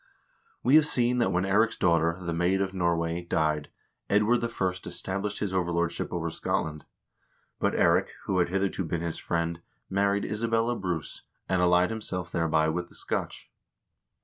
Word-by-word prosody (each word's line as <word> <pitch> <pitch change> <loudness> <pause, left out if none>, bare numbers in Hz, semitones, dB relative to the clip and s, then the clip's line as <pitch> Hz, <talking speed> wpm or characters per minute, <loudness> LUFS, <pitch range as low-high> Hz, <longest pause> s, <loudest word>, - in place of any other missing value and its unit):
We 130 - +3
have 155 -1 +4
seen 125 -2 +1
that 120 - +2
when 90 +2 +1
Eirik's 105 +4 +3
daughter, 85 -1 +2
the 85 -2 -3
Maid 90 +3 +1
of 95 -1 -1
Norway, 85 -2 0
died, 75 -3 0 0.4
Edward 105 +4 +3
I. - - +2 0.4
established 100 +2 -3
his 100 -2 -2
overlordship 85 -2 -1
over 85 -2 -2
Scotland. 75 -1 -2 0.7
But - - +1
Eirik, - - +4 0.2
who 95 -2 0
had 85 - +2
hitherto 95 0 0
been 85 0 -2
his 85 -1 -2
friend, 85 0 -2 0.3
married 100 +1 +1
Isabella 115 +2 0
Bruce, 90 -7 -4 0.3
and 95 -1 +1
allied 90 +2 +4
himself 90 -5 -4
thereby 80 -2 +2
with 85 +2 -2
the - - -13
Scotch. - - -4
90 Hz, 155 wpm, -28 LUFS, 85-100 Hz, 0.7 s, have